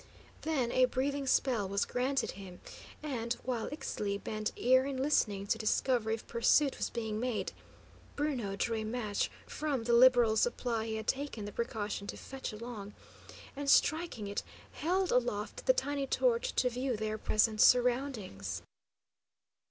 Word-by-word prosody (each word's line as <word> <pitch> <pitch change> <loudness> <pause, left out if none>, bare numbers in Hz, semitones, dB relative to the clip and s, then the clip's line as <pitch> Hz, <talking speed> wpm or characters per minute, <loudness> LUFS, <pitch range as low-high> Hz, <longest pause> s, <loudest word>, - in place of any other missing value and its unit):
Then 270 -7 0
a 255 - +5
breathing 275 +2 -1
spell 235 -7 +2
was 200 +1 +1
granted 260 +2 0
him, 185 -2 -10 0.4
and, 240 -6 -2
while 245 -3 -2
Ixtli 210 -8 -3
bent 215 0 -2
ear 260 +1 +4
in 275 -1 -3
listening 215 -8 +1
to - - 0
discover 225 +1 +1
if 225 0 -2
pursuit 270 +4 +3
was - - -1
being 220 -2 -3
made, 245 -2 -2 0.6
Bruno 260 -9 -1
drew 225 +3 -1
a 220 - -2
match 215 -2 -1 0.2
from 290 -6 -2
the 235 +1 +1
liberal 240 -2 +6
supply 230 -1 0
he 220 - -2
had 220 0 -4
taken 265 -6 -2
the 205 - -6
precaution 210 -3 -3
to - - -5
fetch 270 0 -6
along, 215 -2 -8 0.6
and, 280 0 -3
striking 310 -8 +3
it, 200 0 -3 0.3
held 365 +3 0
aloft 245 - -1
the - - +8
tiny 285 - -1
torch - - +1
to 250 - +2
view 250 0 -1
their 215 0 -3
present 215 +1 +2
surroundings. 240 - +2
240 Hz, 150 wpm, -32 LUFS, 215-270 Hz, 0.6 s, the